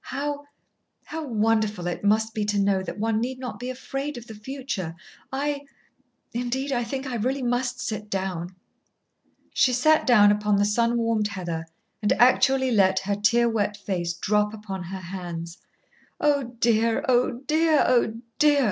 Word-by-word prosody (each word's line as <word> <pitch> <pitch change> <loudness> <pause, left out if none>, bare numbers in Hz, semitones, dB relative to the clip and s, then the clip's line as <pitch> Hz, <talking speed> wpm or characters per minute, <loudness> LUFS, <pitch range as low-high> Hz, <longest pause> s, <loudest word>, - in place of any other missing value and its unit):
How 290 +1 -3 0.6
how 320 -1 -5
wonderful 215 -4 +1
it 175 +2 -3
must 220 +2 +2
be 215 - -1
to 205 0 0
know 195 -1 +2
that 190 - -6
one 220 +1 0
need 255 +2 -3
not 255 -1 -6
be 250 +1 -4
afraid 270 +2 -4
of 235 - -9
the 225 - -10
future! 215 -7 -5 0.4
I 285 +1 -1 0.7
indeed, 250 +4 -2
I 245 -2 +1
think 265 +3 -4
I 260 - -4
really 260 +5 -1
must 245 +1 -1
sit 215 -4 -4
down." 185 -2 -3 1.0
She 255 - +3
sat 310 +6 +3
down 210 -5 +7
upon 210 0 +1
the 200 +1 +3
sun 235 +3 +2
warmed 230 -2 +1
heather 175 -5 -5 0.3
and 210 - +3
actually 260 +2 +4
let 190 -4 +4
her 200 +1 -1
tear 235 +4 +3
wet 210 -3 0
face 180 -4 -2
drop 210 +4 0
upon 200 -3 -6
her 190 +2 -6
hands. 170 -2 -6 0.6
"Oh, 280 -5 +1
dear! 230 -1 +2
Oh, 245 -1 +2
dear! 315 0 +3
Oh, 235 -3 +2 0.2
dear!" 295 -1 +5
225 Hz, 165 wpm, -25 LUFS, 205-255 Hz, 1.0 s, down